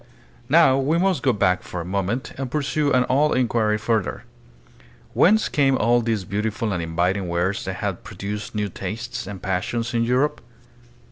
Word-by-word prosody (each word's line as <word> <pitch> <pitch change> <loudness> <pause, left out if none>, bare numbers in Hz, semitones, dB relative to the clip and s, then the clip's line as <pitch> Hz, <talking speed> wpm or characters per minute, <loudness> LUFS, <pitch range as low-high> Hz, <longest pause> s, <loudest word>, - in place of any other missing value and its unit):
Now 145 -3 +5
we 145 +5 +1
must 185 -5 +1
go 130 - +3
back 95 -4 +1
for 90 - -6
a 85 - -5
moment 100 +6 -2
and 135 -1 -4
pursue 145 +1 0
an 125 -1 +3
old 145 +3 +2
inquiry 115 -4 +1
further. 110 -2 -1 0.9
Whence 215 +5 +4
came 135 -2 +2
all 120 +2 +3
these 110 -3 -1
beautiful 105 +2 -2
and 90 - -2
inviting 90 +4 -1
wares 90 +3 -1
that - - -3
had - - -4
produced 105 +2 -6
new 105 -1 0
tastes 110 +4 -5
and 100 -1 -7
passions 115 +6 -2
in 115 0 +2
Europe? 125 +5 +1
115 Hz, 165 wpm, -23 LUFS, 100-130 Hz, 0.9 s, Now